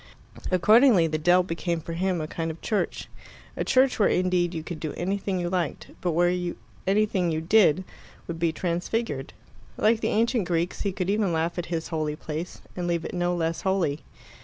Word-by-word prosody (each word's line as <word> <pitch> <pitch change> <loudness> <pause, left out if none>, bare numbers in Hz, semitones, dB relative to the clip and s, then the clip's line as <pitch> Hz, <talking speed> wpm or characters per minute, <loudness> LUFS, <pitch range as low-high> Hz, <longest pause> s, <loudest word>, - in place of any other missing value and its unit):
Accordingly 210 +1 +5
the 155 -1 -1
dell 175 +3 +4
became 170 -1 -2
for 165 +1 -7
him 185 +1 0
a 155 - -3
kind 165 +1 -3
of 160 +1 -6
church 215 -3 -1 0.5
a - - -1
church 260 -1 +3
where 205 - +4
indeed 180 -1 +1
you 160 -3 -5
could 160 0 -6
do 155 - -4
anything 195 +1 -2
you 175 - -1
liked, 175 -3 -2
but 175 -2 0
where 175 +1 +1 0.3
anything 195 -3 +2
you 160 -1 0
did 185 0 +4 0.4
would 165 -1 -5
be 165 -1 +2
transfigured. 170 - -2 0.5
Like 220 +1 +3
the - - -1
ancient 230 -2 +1
Greeks, 170 0 -1
he 200 - 0
could 185 0 -1
even 205 -3 +1
laugh 165 +2 -1
at 170 - -4
his 165 -2 -3
holy 155 -2 -2
place 155 +3 -6
and 180 -1 -3
leave 170 -1 -1
it - - -5
no 175 0 0
less 165 -1 -1
holy. 185 -7 0
175 Hz, 190 wpm, -26 LUFS, 165-190 Hz, 0.5 s, Accordingly